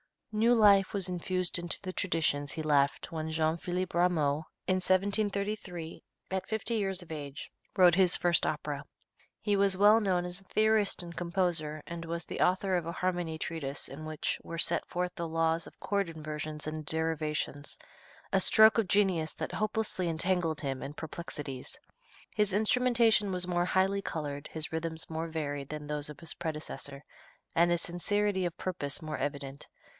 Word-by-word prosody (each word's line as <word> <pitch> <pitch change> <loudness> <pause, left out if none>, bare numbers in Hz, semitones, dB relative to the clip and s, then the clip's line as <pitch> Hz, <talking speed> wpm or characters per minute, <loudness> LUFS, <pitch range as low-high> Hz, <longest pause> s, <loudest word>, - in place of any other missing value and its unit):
New 230 +3 +4
life 200 -3 +5
was 195 -3 0
infused 180 0 0
into 175 -1 0
the 185 -1 -5
traditions 150 -7 0
he 160 - -4
left 140 -2 +2
when 160 -1 -3
Jean 160 0 +1
Philippe 180 +1 -3
Rameau, 160 -4 +2 0.2
in 185 - +2
1733, 200 -2 0 0.3
at 190 0 -2
fifty 220 +1 -2
years 195 -3 -1
of 165 - -14
age, 145 -2 -7 0.2
wrote 180 -2 +7
his 185 -2 +6
first 175 -1 +2
opera. - - -3 0.6
He 205 -1 +1
was 195 -1 +4
well 210 +3 +7
known 185 -4 +1
as 180 +1 -2
a 195 - -16
theorist 215 -2 +2
and 170 -1 -9
composer, 170 -4 -1
and 170 0 -6
was 170 0 -2
the - - -6
author 185 +1 +2
of 170 - -3
a 170 - -3
harmony 175 -3 -1
treatise 150 -4 -4
in 150 +3 -8
which 155 -1 -2
were 165 - -7
set 170 0 +1
forth 180 0 -2
the 170 -1 -3
laws 165 0 0
of - - -15
chord 200 -3 0
inversions 155 -1 -5
and 155 0 -5
derivations, 155 -2 -2 0.5
a 195 - +4
stroke 220 +4 +6
of 220 - +1
genius 185 -6 +2
that - - -5
hopelessly 215 -4 +1
entangled 165 -1 0
him 135 -3 -3
in 145 - -6
perplexities. 145 -4 -7 0.6
His 210 -3 +1
instrumentation 225 -1 +3
was 180 -1 0
more 175 -1 +1
highly 190 +2 +2
colored, 145 -5 -4
his 160 -1 -4
rhythms 160 0 -3
more 160 +1 -2
varied 145 -4 -4
than 150 -1 -5
those 150 0 -3
of 145 -1 -10
his 165 - -2
predecessor, 150 -3 -6 0.5
and 170 +1 +4
his 175 0 +1
sincerity 190 +2 0
of 175 - -3
purpose 170 -7 0
more 155 -1 -4
evident. 140 -1 -4
170 Hz, 170 wpm, -31 LUFS, 155-190 Hz, 0.6 s, wrote